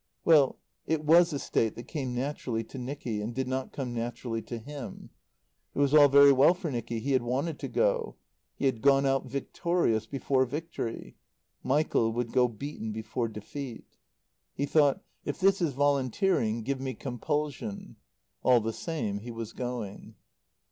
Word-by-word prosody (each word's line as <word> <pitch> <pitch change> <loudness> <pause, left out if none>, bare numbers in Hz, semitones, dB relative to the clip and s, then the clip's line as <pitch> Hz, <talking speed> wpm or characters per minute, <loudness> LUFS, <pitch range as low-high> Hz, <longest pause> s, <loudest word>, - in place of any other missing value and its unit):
Well 150 -5 +5 0.3
it 160 -1 0
was 170 +3 +6
a 145 - -1
state 115 -5 0
that 120 - -7
came 130 -5 -4
naturally 125 -3 -2
to 130 +4 -9
Nicky, 125 -4 -4
and 115 +3 -4
did 130 0 -1
not 130 0 -2
come 130 -4 -4
naturally 115 0 -3
to 120 - -6
him. 135 +2 -8 0.6
It - - -9
was 140 0 +2
all 150 -2 +9
very 140 +1 +8
well 140 +6 +5
for 175 -4 -4
Nicky: 120 -2 -3
he 135 +5 -2
had 130 -2 +3
wanted 135 +7 -2
to - - -4
go. - - 0 0.4
He - - -2
had 125 -5 +1
gone 140 0 +5
out 135 -1 +1
victorious 140 -2 0
before 135 -1 +1
victory. 145 -3 -5 0.4
Michael 130 -5 +2
would 120 0 -2
go 125 -1 +4
beaten 120 -1 -6
before 110 +2 -3
defeat. 115 +4 -8 0.6
He 140 - 0
thought: 145 -1 +3 0.2
"If 145 - -4
this 195 0 +3
is 160 -5 +1
volunteering, 135 - +1
give 135 +3 -2
me 130 -2 -3
compulsion." 140 -3 -4 0.4
All 125 -2 +5
the 115 0 -3
same 110 -12 -3
he 115 +4 -9
was 115 -1 -6
going. 120 -5 -5
130 Hz, 165 wpm, -29 LUFS, 115-145 Hz, 0.6 s, all